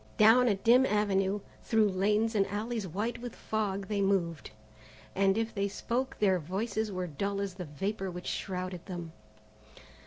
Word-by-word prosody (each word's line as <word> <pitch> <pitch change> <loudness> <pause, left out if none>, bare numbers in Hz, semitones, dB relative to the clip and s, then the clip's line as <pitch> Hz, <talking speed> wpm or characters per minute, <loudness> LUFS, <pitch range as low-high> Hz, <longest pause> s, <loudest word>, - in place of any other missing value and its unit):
Down 225 +4 +7
a 210 - +3
dim 235 +6 +5
avenue, 205 -3 +1 0.2
through 220 -2 +3
lanes 210 +4 +1
and 200 -2 +2
alleys 215 +1 -3
white 210 +8 -3
with 245 -1 -6
fog, 200 -3 -2
they 205 -2 0
moved, 175 -6 0 0.6
and 195 +1 +3
if 225 0 -1
they 200 0 0
spoke 240 +6 -2
their 190 -3 +3
voices 205 +6 -2
were 185 -1 -2
dull 195 +6 -2
as 200 -2 -2
the 180 -1 -6
vapour 195 +6 -3
which 180 0 -7
shrouded 185 -2 -3
them. 175 -3 -6
200 Hz, 160 wpm, -30 LUFS, 185-220 Hz, 0.6 s, Down